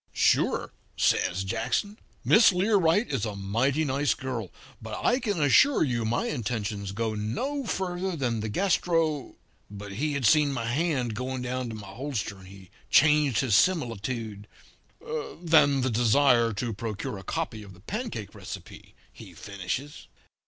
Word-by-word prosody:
"'Sure,' - - +2 0.2
says 95 +1 +1
Jackson. 120 - -2 0.3
'Miss 220 -1 +7
Learight 195 +1 +2
is 120 -6 -1
a 105 -2 -3
mighty 120 +10 0
nice 140 +1 +1
girl, 125 -7 -4 0.3
but - - -6
I 250 - +3
can 205 -8 -2
assure 160 - +5
you 120 -6 -1
my 115 +2 0
intentions 105 -6 -3
go 110 +2 -2
no 190 - -3
further 185 -2 -2
than 120 -6 -1
the 110 0 -3
gastro 165 - 0 0.2
' - - -39
but 100 0 -8
he 140 +7 -1
seen 145 +6 +4
my 120 -4 -3
hand 130 -2 0
going 125 +2 -4
down 125 0 -3
to 110 - -6
my 105 -2 -9
holster 110 -1 -5
and 95 - -14
he 95 -1 -14 0.2
changed 150 -5 +4
his 130 -6 0
similitude 115 - 0 0.9
'than 155 -5 +4
the 130 0 0
desire 120 +1 +4
to 115 +3 -3
procure 105 -1 -5
a - - -11
copy 110 +4 -3
of 100 -3 -12
the - - -18
pancake 195 - -5
recipe,' - - -10 0.2
he - - -13
finishes. 100 +9 -5
125 Hz, 150 wpm, -27 LUFS, 105-155 Hz, 0.9 s, Miss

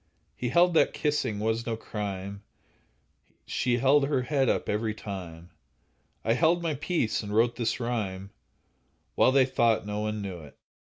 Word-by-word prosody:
He 125 - -3
held 175 +5 +4
that 165 - +3
kissing 150 -8 -1
was 110 +2 -1
no 115 -1 -1
crime; 100 -2 -5 1.0
She 120 -1 0
held 135 +3 +4
her 135 -3 0
head 135 -1 +1
up - - 0
every 110 +1 -1
time; 90 -5 -8 0.7
I 115 - +3
held 170 +6 +2
my 165 -2 0
peace, 150 -4 -1
and 105 -1 -5
wrote 120 +2 +3
this 120 +1 -1
rhyme, 100 -5 -3 0.8
While - - +4
they 135 -1 +5
thought 115 -4 +2
no 105 0 -3
one 105 -1 -2
knew 95 -3 -5
it. 75 -3 -14
115 Hz, 160 wpm, -28 LUFS, 105-135 Hz, 1.0 s, they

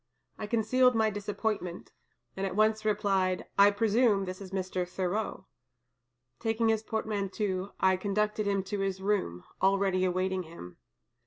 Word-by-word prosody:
I 210 - -4
concealed 250 +3 +3
my 220 -1 +3
disappointment, 205 -3 -3 0.4
and 195 - -4
at 190 -1 -2
once 215 +1 +2
replied, 195 -3 +1
'I 200 +1 +9
presume 210 0 +2
this 185 +1 -6
is 190 - -8
Mr. 185 -1 -3
Thoreau.' 190 +4 -2 0.9
Taking 225 0 +1
his 220 -1 +2
portmanteau, 205 -3 -2
I 190 0 +3
conducted 210 +2 -1
him 200 -1 +1
to 200 +1 -4
his 195 -1 -1
room, 190 - -1 0.2
already 195 -1 +2
awaiting 185 +1 0
him. 160 - -11
200 Hz, 140 wpm, -30 LUFS, 185-215 Hz, 0.9 s, I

